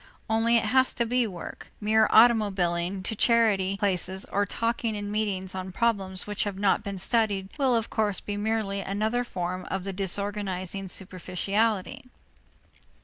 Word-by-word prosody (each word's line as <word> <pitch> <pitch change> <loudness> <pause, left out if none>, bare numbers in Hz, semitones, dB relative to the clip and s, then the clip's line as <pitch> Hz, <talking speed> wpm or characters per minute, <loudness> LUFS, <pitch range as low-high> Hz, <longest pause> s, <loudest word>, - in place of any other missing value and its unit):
Only 225 +1 +3
it - - +1
has 260 0 +3
to 235 - 0
be 245 0 +1
work; 180 -4 -9
mere 220 +1 +3
automobiling 195 -5 +3
to 220 - -1
charity 205 -4 +2
places 190 -1 0
or 200 0 -1
talking 230 0 -1
in 205 0 -5
meetings 200 -3 -2
on 185 0 -5
problems 195 -4 0
which 210 -1 -1
have 200 -2 -4
not 200 +1 +2
been 200 -2 -5
studied 200 -1 0
will, 265 -3 +3
of 225 -1 -1
course, 210 -3 +1
be 205 - -5
merely 205 -1 -1
another 215 +5 -1
form 185 -5 -4
of 190 -1 -3
the 195 0 -4
disorganizing 195 0 -1
superficiality. 195 +6 -1
205 Hz, 150 wpm, -26 LUFS, 190-225 Hz, -, Only